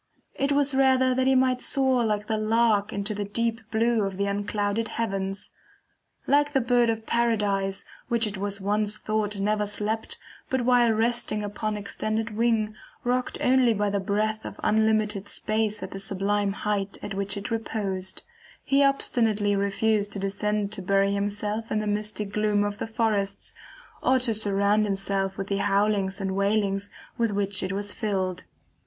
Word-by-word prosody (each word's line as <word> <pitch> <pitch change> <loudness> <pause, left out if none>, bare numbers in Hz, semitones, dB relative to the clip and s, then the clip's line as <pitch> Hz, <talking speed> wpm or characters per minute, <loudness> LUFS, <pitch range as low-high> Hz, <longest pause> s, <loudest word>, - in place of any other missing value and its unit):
It 275 +1 -1
was 285 0 +3
rather 260 -1 +4
that 260 +1 +1
he 265 - +4
might 255 -1 +2
soar 260 -3 +2
like 210 -2 0
the 220 - -1
lark 215 -1 +2
into 200 +1 -2
the 205 0 -3
deep 230 +3 -1
blue 230 0 +2
of 195 -2 -2
the 200 - 0
unclouded 205 +2 -1
heavens. 195 -4 -3 0.7
Like 290 +1 +3
the 270 - +4
Bird 240 -1 +3
of 225 -1 -2
Paradise, 205 -5 0 0.2
which 235 -1 +2
it 210 -1 -4
was 200 0 -1
once 210 +1 +2
thought 215 -2 -2
never 210 +1 0
slept 215 +2 -2 0.3
but 260 -1 0
while 240 -1 +4
resting 225 -1 0
upon 210 +1 -3
extended 215 +2 -3
wing, 225 -2 +1 0.3
rocked 250 +1 -1
only 250 -3 +4
by 205 0 0
the 200 - 0
breath 215 +3 -1
of - - -8
unlimited 215 -2 +1
space 215 -1 -1
at - - -6
the 195 - -6
sublime 200 +1 0
height 200 -1 -2
at 205 - -4
which 195 0 -1
it 205 +4 -5
reposed; 195 -4 -1 0.4
he 280 +1 +3
obstinately 225 -7 +2
refused 205 +1 +1
to - - -3
descend 205 +1 -1
to 215 -2 0
bury 195 +1 +2
himself 205 +2 -2
in - - +1
the 215 - -1
misty 210 0 -1
gloom 210 0 +1
of 205 0 -3
the - - -3
forests, 220 -3 0 0.5
or 260 +1 +3
to 245 -3 +1
surround 205 0 +2
himself 195 -1 -1
with 195 - -3
the 200 0 -1
howlings 200 -1 +1
and 190 -1 -2
wailings 200 0 0 0.3
with 230 -1 +2
which 200 -1 -1
it 185 - -2
is 205 +1 -1
filled. 190 -5 -2
210 Hz, 170 wpm, -26 LUFS, 200-225 Hz, 0.7 s, rather